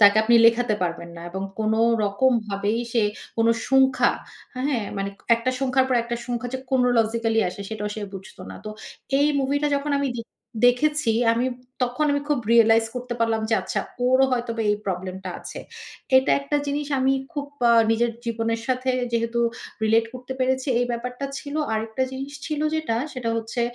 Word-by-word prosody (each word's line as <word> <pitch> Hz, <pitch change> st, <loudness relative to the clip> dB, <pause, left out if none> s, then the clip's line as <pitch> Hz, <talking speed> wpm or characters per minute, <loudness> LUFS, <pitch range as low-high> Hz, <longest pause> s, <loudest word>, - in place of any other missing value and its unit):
তাকে 205 Hz, +1 st, +8 dB
আপনি 235 Hz, +2 st, +4 dB
লেখাতে 230 Hz, -1 st, +3 dB
পারবেন 170 Hz, 0 st, -3 dB
না, 170 Hz, -, -9 dB
এবং 190 Hz, +2 st, -4 dB, 0.2 s
কোন 215 Hz, 0 st, +1 dB, 0.3 s
রকম 205 Hz, +6 st, +2 dB, 0.2 s
ভাবেই 205 Hz, +3 st, -1 dB
সে 230 Hz, -, +3 dB, 0.3 s
কোন 225 Hz, 0 st, +3 dB, 0.2 s
সংখ্যা, 265 Hz, -1 st, +4 dB, 0.4 s
হ্যাঁ? 255 Hz, -3 st, -1 dB
মানে 195 Hz, 0 st, -2 dB, 0.3 s
একটা 230 Hz, +2 st, -1 dB
সংখ্যার 265 Hz, 0 st, +2 dB
পর 255 Hz, -, +2 dB
একটা 235 Hz, 0 st, -3 dB
সংখ্যা 245 Hz, 0 st, -3 dB
যে -, -, -1 dB
chronologically 230 Hz, -3 st, +2 dB
আসে 180 Hz, -, -8 dB
সেটাও 210 Hz, -1 st, -4 dB
সে 220 Hz, -, -6 dB
বুঝত 195 Hz, +3 st, -10 dB
না। -, -, -8 dB
তো 215 Hz, -, -5 dB, 0.5 s
এই 285 Hz, -, +4 dB
মুভি 275 Hz, +1 st, +1 dB
টা 295 Hz, -, +2 dB
যখন 285 Hz, +1 st, -3 dB
আমি 280 Hz, -1 st, 0 dB
দেখ 230 Hz, -1 st, -6 dB, 0.4 s
দেখেছি, 295 Hz, 0 st, +2 dB, 0.2 s
আমি 235 Hz, +2 st, +1 dB, 0.4 s
তখন 250 Hz, +4 st, 0 dB
আমি 285 Hz, -, +1 dB
খুব 295 Hz, -, +2 dB
রিয়ালাইজ 225 Hz, -1 st, +6 dB
করতে 250 Hz, -1 st, -4 dB
পারলাম 225 Hz, -1 st, +2 dB
যে -, -, +4 dB
আচ্ছা -, -, -2 dB, 0.3 s
ওরও 260 Hz, +1 st, +5 dB
হয়তোবা 235 Hz, -2 st, -1 dB
এই 210 Hz, -, +2 dB
প্রবলেম 185 Hz, 0 st, -3 dB
টা 185 Hz, -, -3 dB
আছে। -, -, -8 dB, 0.6 s
এটা 260 Hz, -, +4 dB
একটা 280 Hz, +1 st, -1 dB
জিনিস 285 Hz, +1 st, -2 dB
আমি 265 Hz, +1 st, +3 dB, 0.2 s
খুব 285 Hz, -3 st, -3 dB, 0.2 s
আ -, -, +6 dB, 0.2 s
নিজের 235 Hz, +1 st, +2 dB, 0.2 s
জীবনের 230 Hz, 0 st, -1 dB
সাথে 255 Hz, 0 st, 0 dB, 0.2 s
যেহেতু 230 Hz, +1 st, 0 dB, 0.4 s
রিলেট 225 Hz, +1 st, +3 dB
করতে 255 Hz, +1 st, -6 dB
পেরেছি। 260 Hz, +1 st, 0 dB
এই 245 Hz, -, +1 dB
ব্যাপারটা 250 Hz, +3 st, -4 dB
ছিল। 285 Hz, -1 st, -8 dB, 0.2 s
আরেকটা 220 Hz, +3 st, -1 dB
জিনিস 270 Hz, +2 st, -6 dB
ছিল 305 Hz, -2 st, -2 dB
যেটা, 315 Hz, -8 st, -1 dB, 0.2 s
সেটা 245 Hz, -3 st, -3 dB
হচ্ছে 225 Hz, +2 st, -3 dB
240 Hz, 180 wpm, -24 LUFS, 225-260 Hz, 0.6 s, তাকে